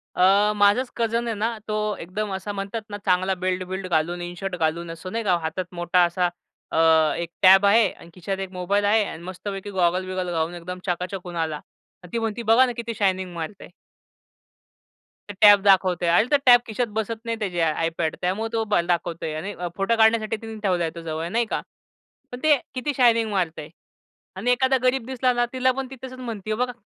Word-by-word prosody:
अ, 200 +3 +4
माझाच 205 +5 +3
कझन 235 +1 0
आहे 225 - -2
ना 225 +2 -2
तो 215 0 -1 0.2
एकदम 200 +4 -4
असा 190 +2 -4
म्हणतात 200 +3 -4
ना 205 - -5
चांगला 185 +1 +2
बेल्ट-बिल्ड 185 +1 -2
घालून 175 +1 0
इन 175 0 -5
शर्ट 195 -2 -3
घालून 165 +1 -1
असं 165 +3 -8
नाही 230 +1 -2
का 185 -4 +2
हातात 180 +3 -4
मोठा 175 +1 +3
असा 175 +1 0 0.4
अ, - - +1 0.4
एक 170 -1 -4
टॅब 190 +1 +7
आहे 205 0 +5
आणि 170 - -15
खिशात 190 +2 -4
एक 190 -1 -5
मोबाईल 195 +3 0
आहे 215 +1 +4
आणि 165 -2 -8
मस्तपैकी 195 +2 -6
गॉगल-बिगल 185 +1 0
घालून 165 +1 -1
एकदम 180 +1 -7
चकाचक 180 +2 -2
होऊन 175 -1 -8
आला. 160 -2 -1 0.5
आणि 180 - -13
ती 230 - 0
म्हणती 225 +1 -3
"बघा 240 +3 +7
ना 250 - -2
किती 235 0 -4
शायनिंग 190 -3 0
मारत 170 +5 -6
आहे?" - - -11 1.6
"ते - - -5
टॅब 205 -2 +8
दाखवतोय." 185 -3 +3
अरे 175 +6 +4
तो 290 - +6
टॅब 245 -1 +8
खिशात 235 +2 -1
बसत 220 +1 -2
नाही 230 -1 -2
त्याची 190 -5 -3
आयपॅड 165 0 0
त्यामुळं 195 +5 -1
तो 225 -1 +1 0.2
दाखवतोय. 170 -2 -2
आणि 195 +6 -5 0.2
फोटो 195 +4 +1
काढण्यासाठी 220 0 +3
तिने 225 -1 -8
ठेवला 180 -3 +1
आहे 165 - -2
तो 170 - -7
जवळ 160 0 -4
नाही 235 +2 +1
का. - - -3 0.7
पण 245 - -7
ते 310 -1 +6 0.2
किती 285 +3 -2
शायनिंग 230 -3 +4
मारतंय. 165 -6 -2 0.7
आणि 220 +7 0
एखादा 260 +2 +3
गरीब 255 -1 +1
दिसला 255 0 0
ना 240 0 +1
तिला 260 0 +2
पण 270 -1 -3
ती - - -7
तसंच 255 0 -8
म्हणते 220 -4 -4
बघा 250 +2 -1
195 Hz, 195 wpm, -24 LUFS, 175-225 Hz, 1.6 s, टॅब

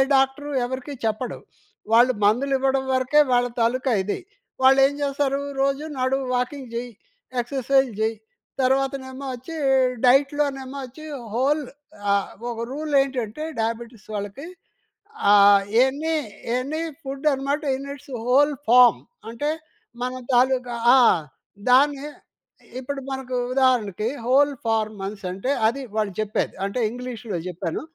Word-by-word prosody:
Doctor 270 +2 +1
ఎవరికీ 260 +3 -5
చెప్పడు. 220 +3 -2 0.6
వాళ్ళు 245 +2 +6
మందులు 245 +7 +2
ఇవ్వడం 265 0 +1
వరకే 260 +3 +3
వాళ్ళ 245 0 +3
తాలూకా 255 +3 +1
ఇది. 205 - -3 0.4
వాళ్ళేం 270 +1 +6
చేస్తారు? 280 0 0 0.2
రోజు 275 +2 0
నడు, 260 +1 +1 0.2
వాకింగ్ 250 0 -3
చేయి, 245 +1 -3 0.5
ఎక్సర్‌సైజ్ 265 +1 +1
చేయి, 220 +1 0 0.5
తర్వాతనేమో 265 0 -1
వచ్చి 260 +7 -10 0.5
డైట్‌లోనేమో 275 0 +2
వచ్చి 265 +5 -12 0.3
హోల్ 290 +5 +2 0.5
ఆహ్, 200 -1 0 0.2
ఒక 235 - -7
రూల్ 300 +2 -4
ఏంటంటే, 260 0 -3 0.2
డయాబెటిస్ 230 0 -4
వాళ్ళకి 205 +9 -6 0.8
ఆహ్, 200 -1 +7 0.2
ఎన్ని 295 +5 0 0.4
ఎనీ 285 +6 -3 0.2
ఫుడ్ 275 +2 -4
అనమాట 275 +3 -2
ఇన్ 275 +1 -8
ఇట్స్ 285 -1 -12
హోల్ 285 +4 +4 0.2
ఫార్మ్ 245 0 +7 0.3
అంటే 235 +6 -2 0.5
మన 250 +1 -2 0.2
తాలూకా 250 0 +2 0.2
ఆ! - - +7 0.7
దాన్ని 275 +2 +4 0.8
ఇప్పుడు 275 +2 -5
మనకు 265 -1 -4 0.2
ఉదాహరణకి 235 -6 +2 0.2
హోల్ 280 +4 +4
ఫార్మ్ 220 -2 0
అనేసంటే 195 +3 -4 0.2
అది 255 +5 -2
వాళ్ళు 215 -2 0
చెప్పేది. 215 -1 -1
అంటే 200 +5 -3
ఇంగ్లీష్‌లో 240 -4 -5
చెప్పాను. 175 -1 -4
260 Hz, 120 wpm, -23 LUFS, 235-275 Hz, 0.8 s, ఆహ్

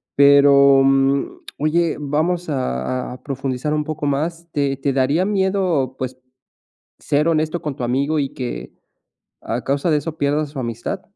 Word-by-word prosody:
pero, 140 -1 +6
mm, 135 0 +1 0.2
oye, 160 +2 +1
vamos 160 +5 -1
a 125 - -2
a 125 - -12
profundizar 135 +1 -3
un 150 0 0
poco 150 -1 -4
más, 165 +4 -2
¿te 140 -2 -1
te 135 0 -1
daría 140 +7 +2
miedo, 190 - 0
pues, 130 0 -5 0.8
ser 145 +2 +1
honesto 160 +1 0
con 150 -4 -4
tu - - -6
amigo 140 +6 0
y 140 - -3
que 120 - -6 0.7
a 120 +2 -3
causa 140 +5 0
de 155 - +3
eso 155 +2 -5
pierdas 145 +1 0
su 140 -1 -7
amistad? 115 -2 -4
140 Hz, 155 wpm, -20 LUFS, 135-155 Hz, 0.8 s, pero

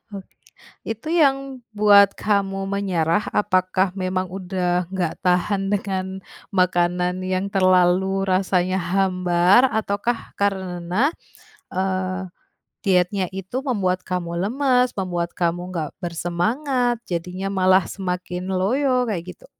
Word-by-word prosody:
Oke, 195 -1 -10 0.5
itu 225 +7 -5
yang 275 -2 +5 0.4
buat 200 -1 +6
kamu 200 -2 0
menyerah, 190 -2 0
apakah 185 -1 +2
memang 185 0 -1
udah 180 -2 -1
enggak 180 -4 -1
tahan 185 +2 +2
dengan 195 -2 -1 0.5
makanan 180 0 +1
yang 185 +1 -1
terlalu 185 0 +3
rasanya 185 0 +1
hambar, 185 +3 +3
ataukah 220 +2 -2
karena, 190 - 0 0.6
eee, 185 0 -2 0.5
dietnya 185 0 +2
itu 195 +7 -5
membuat 195 -9 0
kamu 175 -2 -3
lemas, 250 +4 +2
membuat 175 -2 -2
kamu 175 0 0
nggak 160 -4 -3
bersemangat, 225 - -1
jadinya 180 +2 -4
malah 185 -1 +4
semakin 180 -1 -4
loyo, 250 +7 +1
kayak, 195 -7 -3
gitu? - - -18
185 Hz, 105 wpm, -22 LUFS, 180-200 Hz, 0.6 s, buat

